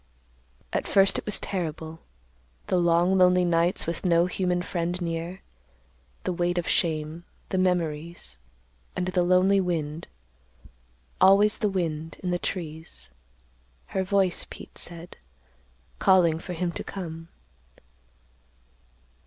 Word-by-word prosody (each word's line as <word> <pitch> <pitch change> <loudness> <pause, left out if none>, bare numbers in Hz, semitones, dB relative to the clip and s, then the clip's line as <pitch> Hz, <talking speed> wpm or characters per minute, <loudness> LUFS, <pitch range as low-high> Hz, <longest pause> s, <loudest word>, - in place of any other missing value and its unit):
"At - - -1
first 195 0 +4
it - - -9
was 210 - +1
terrible; 160 -3 -4 0.7
the 185 - +1
long, 175 +2 +3
lonely 180 0 +5
nights 170 +1 +2
with 170 0 -3
no 170 -2 +4
human 180 -1 0
friend 175 0 -2
near; 170 +1 -4 0.8
the 185 - -1
weight 175 0 0
of 175 - -1
shame; 160 0 0 0.3
the 190 - 0
memories; 170 - -1 0.6
and 180 - -1
the 180 -1 +1
lonely 185 +2 +4
wind—always 105 - -1
the 210 - +1
wind—in 165 -1 -3
the 175 - 0
trees—her 65 - -7
voice, 190 -2 +1
Pete - - -9
said, 170 0 -7 0.8
calling 175 -4 +4
for 180 +1 -6
him 175 0 -1
to - - -5
come. 165 -4 -7
175 Hz, 110 wpm, -26 LUFS, 160-185 Hz, 0.8 s, lonely